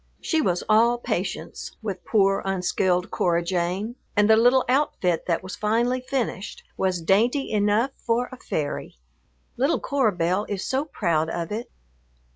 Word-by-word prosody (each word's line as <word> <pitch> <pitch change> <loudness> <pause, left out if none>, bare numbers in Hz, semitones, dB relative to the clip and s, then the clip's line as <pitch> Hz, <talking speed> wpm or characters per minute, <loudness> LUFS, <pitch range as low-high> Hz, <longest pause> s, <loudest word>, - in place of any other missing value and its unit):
She 320 -2 0
was 180 - 0
all 230 +3 +4
patience 240 - -4
with 195 -4 -4
poor, 195 -3 +2
unskilled 185 -1 0
Cora 170 -1 +1
Jane, 185 +6 -2 0.2
and 205 -1 +4
the 220 - +7
little 245 +3 +4
outfit 235 - +1
that 170 0 0
was 185 0 -6
finally 235 +4 +1
finished 250 -7 -3
was 185 -3 -1
dainty 235 - +2
enough 210 +5 +2
for 240 +1 0
a 255 - -9
fairy. 145 - -4 0.6
Little 275 +6 +2
Cora 270 -6 +1
Belle 180 +4 0
is 200 -1 -3
so 270 +3 0
proud 170 - 0
of 170 +1 -4
it. 225 +3 -4
210 Hz, 150 wpm, -24 LUFS, 180-245 Hz, 0.6 s, the